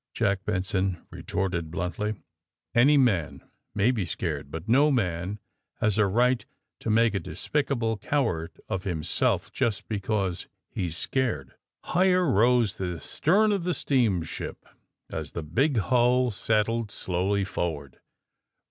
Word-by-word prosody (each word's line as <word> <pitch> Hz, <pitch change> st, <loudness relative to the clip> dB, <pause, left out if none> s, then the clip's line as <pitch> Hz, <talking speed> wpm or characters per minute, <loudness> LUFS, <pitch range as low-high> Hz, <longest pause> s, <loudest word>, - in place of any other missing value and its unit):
Jack 100 Hz, 0 st, 0 dB
Benson 95 Hz, -2 st, -1 dB
retorted 85 Hz, -4 st, -2 dB
bluntly. 90 Hz, +6 st, -2 dB, 0.6 s
*^Any 140 Hz, +5 st, +6 dB
man 100 Hz, -, +1 dB, 0.3 s
may 105 Hz, +5 st, +3 dB
be 115 Hz, -6 st, -1 dB
seared, 75 Hz, -5 st, -3 dB
but 80 Hz, +6 st, -7 dB
no 140 Hz, +6 st, +5 dB
man 95 Hz, -, -1 dB, 0.4 s
has 110 Hz, -1 st, +1 dB
a 105 Hz, -, +4 dB
right 120 Hz, +5 st, +2 dB, 0.4 s
to -, -, -4 dB
make 115 Hz, 0 st, +4 dB
a 100 Hz, -, 0 dB
despicable 120 Hz, -6 st, -1 dB
coward 95 Hz, -, -1 dB
of 95 Hz, -3 st, -3 dB
himself 85 Hz, -6 st, 0 dB
just 110 Hz, -4 st, -1 dB
because 100 Hz, -4 st, -2 dB, 0.2 s
he's 85 Hz, -3 st, -2 dB
scared." 110 Hz, -, -1 dB, 0.3 s
Higher 180 Hz, 0 st, +3 dB
rose 120 Hz, -2 st, +3 dB
the 90 Hz, -3 st, -3 dB
stern 210 Hz, -, +2 dB
of 200 Hz, -4 st, 0 dB
the 180 Hz, 0 st, 0 dB
steamship 110 Hz, -, -1 dB, 0.5 s
as -, -, -5 dB
the 85 Hz, -, -4 dB
big 125 Hz, -, +1 dB
hull 125 Hz, +3 st, +3 dB
settled 110 Hz, +2 st, 0 dB
slowly 95 Hz, +1 st, -1 dB
forward. 80 Hz, -8 st, -4 dB
105 Hz, 130 wpm, -27 LUFS, 90-125 Hz, 0.6 s, ^Any